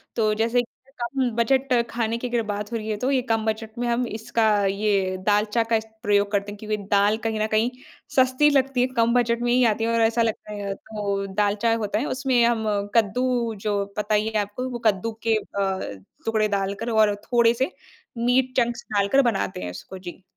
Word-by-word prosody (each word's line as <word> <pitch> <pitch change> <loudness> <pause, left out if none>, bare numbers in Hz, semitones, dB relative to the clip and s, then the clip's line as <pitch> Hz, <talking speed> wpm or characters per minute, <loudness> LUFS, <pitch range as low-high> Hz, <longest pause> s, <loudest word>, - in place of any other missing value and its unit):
तो 215 -2 +2
जैसे 230 +3 +2
कि 260 +2 -16
कम 250 +1 0
बजट 260 +3 +2 0.2
खाने 230 -1 -1
की 250 - -4
अगर 240 -1 +1
बात 210 0 -4
हो 230 - -1
रही 220 0 -6
है, 210 - -1
तो 250 +4 -1
ये 265 -2 +2
कम 225 -3 -1
बजट 220 +1 -3
में 245 - -1
हम 240 +1 +1
इसका 225 +1 -1 0.2
ये 195 -1 0
दालचा 210 +2 +2
का 225 0 0
इस 220 0 -1 0.2
प्रयोग 205 -2 +2
करते 200 0 -1
हैं, 205 - -9
क्योंकि 215 0 -2
दाल 205 +1 +4
कहीं 220 -1 -1
न 215 - +1
कहीं 220 +2 +2 0.5
सस्ती 260 +3 +4
लगती 270 -2 +2
है 250 - +3
कम 230 0 +3
बजट 235 -1 +2
में 240 0 +1
ही 250 +1 +4
आती 225 0 +1
है 230 - +1
और 230 - +2
ऐसा 225 +1 +3
लगता 220 -2 -2
है, 200 -1 -4
तो 200 -2 -3
दालचा 210 +3 +1
होता 210 -2 -1
है। 260 - -1
उसमें 260 -3 +1
हम 230 -2 +1 0.3
कद्दू 235 +1 +1
जो 205 -1 0
पता 210 0 +1
ही 210 +1 +1
है 220 - -2
आपको 215 +6 -4
वो 240 - -5
कद्दू 215 +1 +2
के 225 -1 +3
अ, 190 - -3 0.2
टुकड़े 220 -1 +2
डाल 200 -1 -1
कर 230 +4 -5
और 215 -2 +3
थोड़े-से 240 +4 +2 0.5
मीट 250 +2 +2
चंक्स 240 -1 +1
डालकर 200 +6 +3
बनाते 210 - -1
हैं 90 - -4
उसको 190 - -9
जी। 185 0 -10
225 Hz, 210 wpm, -24 LUFS, 205-240 Hz, 0.5 s, दाल